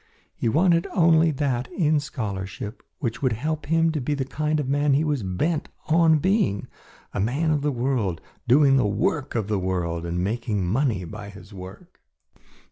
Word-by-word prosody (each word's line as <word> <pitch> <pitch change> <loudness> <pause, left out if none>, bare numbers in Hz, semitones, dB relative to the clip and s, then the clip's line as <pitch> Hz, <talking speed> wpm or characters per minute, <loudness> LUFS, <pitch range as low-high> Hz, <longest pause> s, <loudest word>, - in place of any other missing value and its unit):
He 115 - 0
wanted 170 +5 +3
only 165 -2 +5
that 135 -4 -1
in 155 -4 +2
scholarship 105 -6 -5 0.2
which 115 -5 -3
would 130 -4 +2
help 150 +6 -3
him 165 +1 +3
to 155 -3 -2
be 145 +4 -1
the 135 -2 -2
kind 150 +3 -1
of 145 - -2
man 145 0 +2
he 150 - +2
was 150 -5 0
bent 105 - -1 0.2
on 160 0 +5
being, 170 - +1 0.5
a - - -2
man 140 +10 +1
of 150 -2 +1
the 145 0 +1
world 120 -8 -1 0.3
doing 135 +2 +5
the 115 - +3
work 130 +8 -1
of 110 -4 -1
the 105 -2 0
world 90 -3 -2
and 90 +1 -1
making 105 -2 -1
money 110 0 0
by 100 +4 -8
his 100 +1 -13
work. 95 - -11
135 Hz, 180 wpm, -24 LUFS, 100-155 Hz, 0.5 s, only